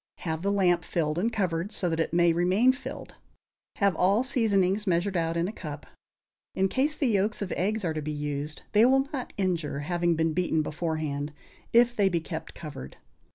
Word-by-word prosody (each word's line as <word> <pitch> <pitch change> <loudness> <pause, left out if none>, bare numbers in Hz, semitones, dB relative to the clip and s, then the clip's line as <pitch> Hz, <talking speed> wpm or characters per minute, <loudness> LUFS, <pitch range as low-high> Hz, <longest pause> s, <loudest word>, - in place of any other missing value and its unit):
Have 160 -2 -3
the 200 +2 0
lamp 180 -4 +2
filled 155 -1 -1
and 225 +6 +1
covered, 185 -3 -1
so 180 - -1
that 165 -1 -1
it 160 - 0
may 170 0 +4
remain 185 +9 +3
filled. 265 - -8 0.6
Have 200 -4 +2
all 195 +8 +3
seasonings 210 -6 +1
measured 185 +2 +1
out 165 -1 0
in 170 +1 +1
a - - -3
cup. 155 -9 -8 0.7
In 190 0 +2
case 285 +7 +1
the 295 - -1
yolks 210 -2 +1
of 185 - -6
eggs 210 +2 -1
are 160 - 0
to 155 - -3
be 155 +1 -4
used, 145 0 -4
they 215 +1 +5
will 270 +2 +4
not 260 -3 -4
injure, 170 -7 -1
having 175 +2 0
been 160 0 +1
beaten 165 -2 +1
beforehand, 150 -2 -3 0.4
if 240 +1 +4
they 200 -3 +3
be 175 -2 0
kept 160 0 -7
covered. 145 - -8
175 Hz, 195 wpm, -27 LUFS, 160-205 Hz, 0.7 s, they